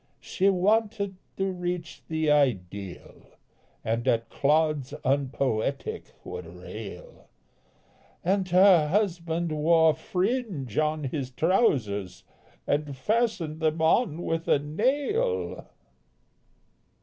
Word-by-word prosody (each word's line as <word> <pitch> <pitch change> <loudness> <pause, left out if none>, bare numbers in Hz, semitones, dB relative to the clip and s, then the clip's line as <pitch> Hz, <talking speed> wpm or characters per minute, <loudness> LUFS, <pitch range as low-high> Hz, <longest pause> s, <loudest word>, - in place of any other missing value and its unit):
She 195 +1 +1
wanted 200 +1 +1 0.2
to 195 0 0
reach 175 -3 -4
the 160 -1 +1
ideal, 100 -10 -2 0.5
And 115 +3 -1
at 115 -2 +1
clods 150 -1 +1
unpoetic 135 -1 -1 0.2
would 90 -1 -7
rail, 90 +2 -10 0.9
And 190 +1 +1
her 180 -3 +6
husband 170 -3 0
wore 160 +1 +4
fringe 185 - -2
on 155 0 0
his 135 -1 -3
trousers 120 - +1 0.4
And 145 -2 -1
fastened 185 - 0
them 160 0 0
on 165 +1 +2
with 165 0 -2
a - - +5
nail! 280 - -1
160 Hz, 95 wpm, -27 LUFS, 135-185 Hz, 0.9 s, her